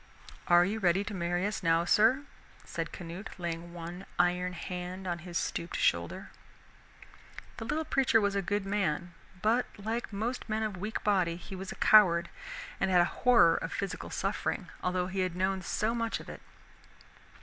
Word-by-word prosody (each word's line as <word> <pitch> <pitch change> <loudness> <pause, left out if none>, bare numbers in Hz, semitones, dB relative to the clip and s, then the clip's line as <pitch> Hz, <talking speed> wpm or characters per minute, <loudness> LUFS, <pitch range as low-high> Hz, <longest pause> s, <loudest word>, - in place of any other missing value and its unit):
"Are 175 -1 +6
you 210 +4 -2
ready 185 0 +3
to 205 +1 -6
marry 175 0 -1
us 210 +1 -2
now, 165 -1 +3
sir?" 225 +9 +4 0.4
said - - -4
Canute, 180 +3 -7
laying 170 -1 -4
one 175 +2 -8
iron 180 +1 +2
hand 180 +1 -5
on 175 -1 -2
his 170 0 -4
stooped 170 - -2
shoulder. 85 0 0 1.3
The 225 - -5
little 310 +7 -1
preacher 270 -6 +3
was 200 -2 +1
a 200 - +1
good 205 +2 -1
man, 175 -4 -1 0.3
but 230 +4 +3
like 225 +4 -3
most 225 +4 -3
men 220 0 0
of 215 -2 -2
weak 210 +4 -4
body 185 -5 +2
he 180 +2 -9
was 190 0 -6
a - - -7
coward 170 -6 +6 0.5
and 195 - +1
had 180 -1 +5
a - - +4 0.2
horror 235 -10 +6
of - - -4
physical 200 -2 -4
suffering, - - -2
although 180 0 0
he 190 +1 -4
had 185 -2 0
known 190 +1 0
so 215 +5 -1
much 230 -1 -1
of - - -11
it. - - -9
185 Hz, 175 wpm, -30 LUFS, 175-210 Hz, 1.3 s, Are